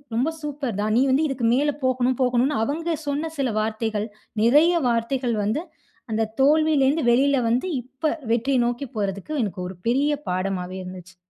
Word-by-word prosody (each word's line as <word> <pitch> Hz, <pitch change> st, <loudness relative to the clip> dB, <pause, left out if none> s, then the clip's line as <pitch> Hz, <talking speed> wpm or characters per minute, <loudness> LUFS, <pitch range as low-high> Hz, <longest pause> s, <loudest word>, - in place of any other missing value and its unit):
ரொம்ப 270 Hz, +7 st, +1 dB
சூப்பர் 280 Hz, -7 st, -4 dB
தான். 215 Hz, +1 st, 0 dB
நீ! -, -, +4 dB
வந்து 295 Hz, +4 st, +3 dB
இதுக்கு 245 Hz, -4 st, -1 dB
மேல 295 Hz, +2 st, +2 dB
போகணும், 255 Hz, -1 st, +1 dB
போகணுன்னு 250 Hz, +2 st, +1 dB
அவங்க 325 Hz, +6 st, -1 dB
சொன்ன 300 Hz, +3 st, -2 dB
சில 260 Hz, -4 st, +1 dB
வார்த்தைகள், 220 Hz, 0 st, -2 dB, 0.4 s
நிறைய 300 Hz, +9 st, +5 dB, 0.2 s
வார்த்தைகள் 235 Hz, +1 st, 0 dB
வந்து 240 Hz, +11 st, -1 dB, 0.5 s
அந்த 220 Hz, 0 st, +1 dB, 0.2 s
தோல்விலேருந்து 300 Hz, -1 st, +3 dB
வெளில 275 Hz, +3 st, +3 dB
வந்து, 250 Hz, +10 st, +1 dB, 0.2 s
இப்ப, 265 Hz, +4 st, -2 dB, 0.2 s
வெற்றிய 255 Hz, +2 st, +1 dB
நோக்கி 245 Hz, +3 st, -3 dB
போறதுக்கு 200 Hz, +7 st, -3 dB
எனக்கு 185 Hz, -3 st, -4 dB
ஒரு 185 Hz, -, -10 dB
பெரிய 285 Hz, +4 st, +2 dB, 0.2 s
பாடமாவே 185 Hz, 0 st, -2 dB
இருந்துச்சு. 180 Hz, 0 st, -10 dB
250 Hz, 155 wpm, -23 LUFS, 220-285 Hz, 0.5 s, நிறைய